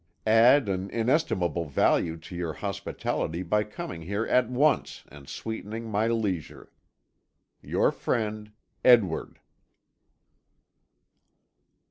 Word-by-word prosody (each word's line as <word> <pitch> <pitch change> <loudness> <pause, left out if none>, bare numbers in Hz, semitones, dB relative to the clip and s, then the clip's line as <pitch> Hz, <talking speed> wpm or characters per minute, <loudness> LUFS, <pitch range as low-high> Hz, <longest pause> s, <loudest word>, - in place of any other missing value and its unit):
Add 115 +4 +5
an 95 0 -2
inestimable 110 - 0
value 80 +3 +1
to 80 +2 -11
your 85 -2 -3
hospitality 85 +3 -3
by 105 +4 +1
coming 90 -5 -7
here 100 +7 -2
at 125 -2 +2
once 140 +4 +1
and 70 -2 -13
sweetening 110 0 -6
my 105 +2 +1
leisure. 105 -8 -3 0.9
"Your - - +1
friend, 105 -1 -3 0.3
"Edward." 115 -10 +3
105 Hz, 95 wpm, -27 LUFS, 85-115 Hz, 0.9 s, Add